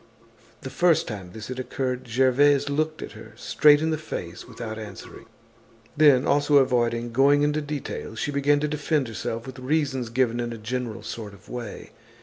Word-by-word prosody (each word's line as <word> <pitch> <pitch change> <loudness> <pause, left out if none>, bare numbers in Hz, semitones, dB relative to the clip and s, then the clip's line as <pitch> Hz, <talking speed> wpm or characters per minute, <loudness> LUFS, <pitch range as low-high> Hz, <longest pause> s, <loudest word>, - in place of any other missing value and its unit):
The 135 - -7
first 175 -2 +3
time 100 -5 -6
this 110 +5 -9
had 130 0 -5
occurred 130 -1 -3
Gervaise 135 +4 +3
looked 155 +2 -1
at - - -8
her - - -12
straight 150 0 +4
in 160 - +1
the 155 - -1
face 90 - -7
without 110 -1 -7
answering. 105 -3 -10 0.7
Then, 145 -4 +5
also 145 +1 +2
avoiding 120 -3 +2
going 140 +4 +4
into 150 +1 +1
details, 145 -6 -5
she 145 - -2
began 145 +1 +2
to 150 - +1
defend 150 -2 0
herself 115 +1 -4
with 130 0 -9
reasons 130 -3 -1
given 120 -1 +1
in 120 -1 -3
a - - -7
general 115 0 -4
sort 110 -2 -7
of 100 - -20
way. 120 -4 -7
130 Hz, 175 wpm, -25 LUFS, 115-145 Hz, 0.7 s, Then